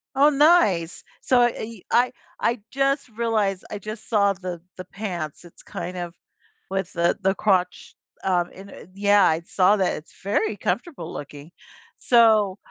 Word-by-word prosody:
Oh, 285 +2 +6
nice! 275 - +3 0.2
So 250 -2 +3
I 240 -1 +3
y 220 -3 -7
I 250 +1 +3 0.3
I 235 -1 0
just 275 -1 0
realized 215 -4 -1
I 210 - -5
just 215 +2 -8
saw 200 -3 +3
the 180 -3 -7 0.2
the 185 - -7
pants, 175 -5 -6
it's 170 - -16
kind 180 +1 -6
of 175 -1 -5 0.6
with 190 -2 -2
the 170 0 +1
the 190 +1 +1
crotch, 185 -3 0 0.3
um, 180 -2 +1
and 195 +1 -11
and - - -13
yeah. 205 0 +4
I 160 -1 +2
saw 190 +2 +3
that, 190 -2 +1
it's 155 - -14
very 210 - 0
comfortable 285 - -3
looking! 145 +2 -9 0.5
So 220 -5 +4
200 Hz, 160 wpm, -23 LUFS, 180-230 Hz, 0.6 s, Oh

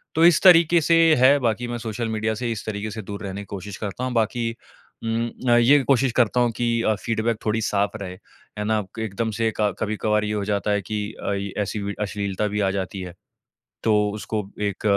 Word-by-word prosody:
तो 165 - +5
इस 170 -3 +6
तरीके 170 -2 +7
से 165 +2 +3 0.2
है, 130 +2 +6
बाकी 120 -1 -1
मैं 120 0 -3
सोशल 115 +1 -3
मीडिया 110 0 -1
से 120 +2 -2
इस 110 - -5
तरीके 105 0 -4
से 110 +1 -5
दूर 100 +2 -7
रहने 100 0 -5
की - - -9
कोशिश 100 0 -7
करता 105 +4 -5
हूँ, 130 -1 -2
बाकी 115 0 0 0.5
उम 115 +1 -1 0.2
अ, - - +6
ये 130 +5 +6
कोशिश 135 -1 +2
करता 120 +1 +3
हूँ 120 -1 +2
कि 120 -1 +1
अ, 110 - +2
फीडबैक 115 -1 0
थोड़ी 110 +1 +1
साफ 100 -1 0
रहे, 90 -2 -5 0.5
है - - -1
ना? 110 0 +1 0.2
क - - -4
एकदम 110 +1 -2
से 115 -1 +2
क 105 -2 +2
कभी-कभार 105 0 0
ये 105 - -2
हो 105 -1 -1
जाता 105 0 0
है, 105 0 +1
कि 105 +2 -4 0.2
आई 100 0 -2
ऐसी 105 +1 -3
वि 100 0 -3
अश्लीलता 100 0 -2
भी 105 +1 -2
आ 95 -1 +2
जाती 95 0 -4
है। 90 -1 -7 0.7
तो 110 - +3 0.2
उसको 105 0 -3 0.2
एक 100 -2 -2
110 Hz, 220 wpm, -23 LUFS, 100-120 Hz, 0.7 s, तरीके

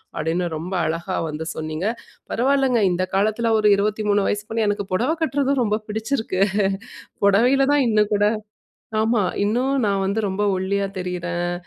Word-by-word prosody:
அப்படீன்னு 165 +3 -1
ரொம்ப 175 +5 -5
அழகா 170 +4 -2
வந்து 155 +1 -5
சொன்னீங்க. 155 +3 -4 0.4
பரவால்லங்க! 265 -1 +2
இந்த 180 +1 0
காலத்தில 215 +3 +1
ஒரு 215 -1 +3
23 205 0 +1
வயசு 205 0 -1
பொண்ணு, 225 -1 0
எனக்கு 205 0 0
பொடவை 245 - +1
கட்டுறதும் 280 -3 +1
ரொம்ப 215 -2 +1
புடிச்சிருக்கு. 220 -2 -2 0.8
பொடவையில 245 +7 +4
தான் 290 -1 +4
இன்னும் 210 -2 +2
கூட 205 0 +3 0.8
ஆமா. 225 -1 +2 0.2
இன்னும் 245 +6 +1 0.2
நான் 195 -1 +1
வந்து 205 +3 0
ரொம்ப 190 +2 -2
ஒல்லியா 195 +1 -1
தெரியிறேன். 175 -1 -3
205 Hz, 145 wpm, -22 LUFS, 185-230 Hz, 0.8 s, பொடவையில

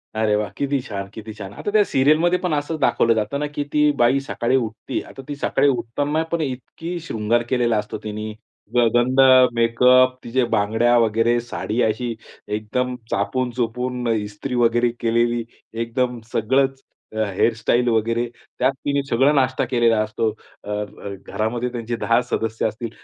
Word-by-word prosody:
अरे 110 -1 +2
वाह! 105 0 -1
किती 140 0 0
छान, 100 -6 -6
किती 110 0 -8
छान. 100 -2 -9
आता 205 - -4
त्या 210 0 +5
सीरियलमध्ये 155 +6 +3
पण 180 -3 -1
असंच 150 +2 -2
दाखवलं 115 -4 +3
जातं 110 +5 -1
ना 150 - -1
की 145 - -1
ती 150 0 +4
बाई 125 +2 +4
सकाळी 130 -2 -1
उठते. 115 0 -2
आता 135 - -10
ती 145 - -4
सकाळी 140 0 +1
उठताना 145 +5 -1
पण 170 -1 0
इतका 150 +5 -5
शृंगार 115 +2 +1
केलेला 120 -3 +2
असतो 105 0 -3
तिने. 110 0 -5 0.4
ग 120 -1 +5
गंध, 125 +2 +2 0.4
मेकअप, 125 +2 +4
तिच्या 125 +1 0
बांगड्या 110 +3 +3
वगैरे, 115 +1 +2
साडी 120 -1 -3
अशी 115 +2 0 0.4
एकदम 125 +4 -2 0.2
चापून-चोपून, 125 0 -1
इस्त्री 110 +3 -2
वगैरे 120 0 +3
केलेली 120 0 +1 0.4
एकदम 125 +1 -1
सगळंच, 135 +4 +1 0.3
अ, 110 - +1
हेअर 115 +5 +2
स्टाइल 120 +2 +1
वगैरे. 115 +1 +1 0.3
त्यात 130 +2 +3
तिने 140 -1 +1
सगळा 135 +5 +4
नाश्ता 130 -2 +1
केलेला 120 -3 +2
असतो. 110 +1 -1 0.3
अ, - - -9
अ, 105 -1 -5
घरामध्ये 120 +3 -2
त्यांचे 120 -1 -4
10 115 +1 +2
सदस्य 110 0 0
असतील, 110 +2 -5
120 Hz, 160 wpm, -21 LUFS, 110-130 Hz, 0.4 s, त्या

